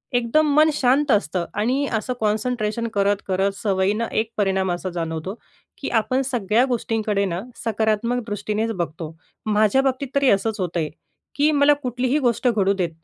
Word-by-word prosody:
एकदम 285 +5 +2
मन 310 +1 +6
शांत 275 +2 +2
असतं 180 -4 +1
आणि 250 +7 0
असं 220 +3 -1
कॉन्सन्ट्रेशन 220 +1 -1
करत-करत 200 -1 +1
सवयीनं 200 +3 0
एक 220 +1 -1
परिणाम 190 -2 +1
असा 175 +2 -3
जाणवतो 165 +1 -4 0.4
की 280 - -4
आपण 255 +4 0
सगळ्या 235 -1 +1
गोष्टींकडे 220 -5 -1
ना 175 -1 -3 0.2
सकारात्मक 225 +2 0
दृष्टीनेच 215 +2 -2
बघतो. 165 -4 -5 0.3
माझ्या 215 +4 +3
बाबतीत 270 +1 -1
तरी 280 -2 +4
असंच 210 +2 +1
होतंय 170 -3 -1 0.5
की 295 +2 +4
मला 290 0 +5
कुठलीही 255 0 -1
गोष्ट 245 -2 +1
घडू 200 -3 +2
देत, 185 -4 -1
215 Hz, 145 wpm, -22 LUFS, 195-250 Hz, 0.5 s, मन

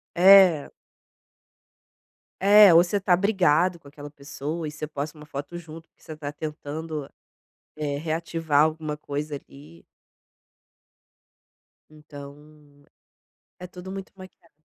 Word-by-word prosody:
É. 185 -4 +6 1.7
É, 200 0 +7
ou 170 - +7
você 190 +3 -2
tá 185 -2 +3
brigado 185 -3 +2
com 145 - -17
aquela 145 0 -11
pessoa 150 +3 -6
e - - -4
você 155 0 -7
posta 150 +1 -6
uma 150 0 -13
foto 145 +3 -7
junto, 165 -1 -11
porque - - -34
você 155 - -10
tá 145 -1 -6
tentando, 150 0 -6 0.7
eh, 145 -2 -3
reativar 160 -1 -1
alguma 155 -1 -2
coisa 145 0 -5
ali. 80 - -14 2.1
Então 145 -1 -15 0.7
é 180 - -8
tudo 180 +1 -11
muito 195 -1 -8
maquiado. 185 -4 -16
155 Hz, 120 wpm, -24 LUFS, 145-175 Hz, 2.1 s, É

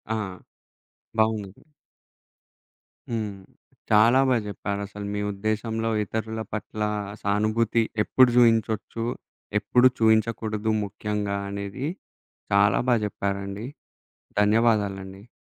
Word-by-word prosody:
ఆ! - - -1 1.0
బావుంది. 110 -3 0 1.5
హ్మ్. 105 -3 -2 0.6
చాలా 115 +4 +6
బా 125 - +4
జెప్పారు. 100 0 -4
అసలు 105 0 -8
మీ 105 - -2
ఉద్దేశంలో 110 +2 -2
ఇతరుల 110 +2 -4
పట్ల 110 0 -5 0.4
సానుభూతి 110 +3 +1 0.2
ఎప్పుడు 130 +2 +5
జూయించచ్చు, 115 -1 +2 0.5
ఎప్పుడు 125 +5 +4
చూయించకూడదు 110 -1 +2
ముఖ్యంగా 105 0 -3
అనేవి 100 +7 -4 0.7
చాలా 100 0 +4
బా 125 - +5
జెప్పారండి. 100 +1 -3 0.7
ధన్యవాదాలండి. 105 -2 +1
110 Hz, 85 wpm, -25 LUFS, 100-115 Hz, 1.5 s, చాలా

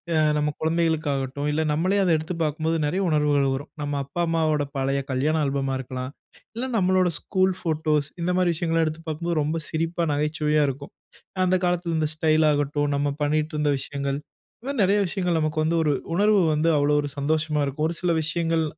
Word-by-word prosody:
ஆ - - +3 0.2
நம்ம 150 0 +1
குழந்தைகளுக்கு 160 -1 +1
ஆகட்டும், 135 +2 -3
இல்ல 155 +2 0
நம்மளே 185 +7 +1
அத 180 - +1
எடுத்து 160 +3 -4
பார்க்கும்போது 160 +2 0
நெறைய 185 +6 0
உணர்வுகள் 145 -2 +2
வரும். 145 +3 -5
நம்ம 145 0 -3
அப்பா, 140 +6 -4
அம்மாவோட 155 -3 +1
பழைய 135 +1 0
கல்யாணம் 150 +4 +1
ஆல்பமா 135 -1 -1
இருக்கலாம். 130 +1 -5 0.4
இல்ல 245 - -2
நம்முடைய 185 -2 +2
ஸ்கூல் 190 0 +1
போட்டோஸ், 155 -3 0
இந்தமாரி 180 +1 +1
விஷயங்கள் 165 0 +1
எடுத்து 155 0 -3
பார்க்கும்போது, 165 +1 -2
ரொம்ப 155 +3 -1
சிரிப்பா, 165 +2 -1
நகைச்சுவையா 150 +1 +1
இருக்கும். 140 +2 -7 0.5
அந்த 185 0 +3
காலத்துல 175 -1 0
இந்த 155 -1 0
ஸ்டைல் 155 0 +3
ஆகட்டும், 145 0 0
நாம 140 0 0
பண்ணிட்டுருந்த 150 0 0
விஷயங்கள் 140 0 -3 0.4
இந்தமாரி 275 0 -4
நெறைய 200 +2 +3
விஷயங்கள் 180 -3 -1
நமக்கு 155 0 -1
வந்து 165 +2 +1
ஒரு 150 - +2 0.2
உணர்வு 205 +3 +4
வந்து 155 +2 +2
அவ்வளவு 145 +1 +3
ஒரு 145 - -4
சந்தோஷமா 150 +1 0
இருக்கும். 140 +3 -2
ஒரு 170 - -4
சில 180 -1 +1
விஷயங்கள் 165 0 0
155 Hz, 175 wpm, -24 LUFS, 145-170 Hz, 0.5 s, உணர்வு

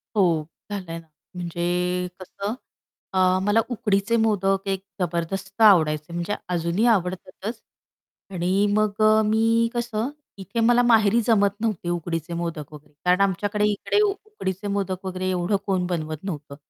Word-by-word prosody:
हो, 170 -6 +3 0.3
झालंय 180 -5 -4
ना. 165 - -18 0.3
म्हणजे 180 +1 -1
कसं 200 +4 -5 0.6
अ, - - -1 0.3
मला 205 +3 +3
उकडीचे 215 -2 +1
मोदक 195 -2 +1
एक 190 -1 -2 0.2
जबरदस्त 190 +4 -3
आवडायचे. 160 -6 +5
म्हणजे 175 +4 -2 0.2
अजूनही 170 +5 +1
आवडतातच. 190 +1 -1 0.7
आणि 180 -1 -1 0.2
मग 215 0 +1
अ, 215 0 +6
मी 225 +2 +3
कसं, 235 0 -2 0.3
इथे 195 +4 -5
मला 240 0 +5
माहेरी 225 -1 +4
जमत 200 -3 +3
नव्हते 210 -6 -1
उकडीचे 170 -1 -3
मोदक 165 -3 -4
वगैरे. 150 0 -14
कारण 180 +2 +4
आमच्याकडे 205 +2 +1
इकडे 205 - 0
उ 420 - +4 0.2
उकडीचे 205 - -4
मोदक 190 -1 -3
वगैरे 185 0 -2
एवढं 180 +2 0
कोण 185 -3 0
बनवत 155 -3 -3
नव्हतं. 150 -7 -6
190 Hz, 140 wpm, -24 LUFS, 175-215 Hz, 0.7 s, अ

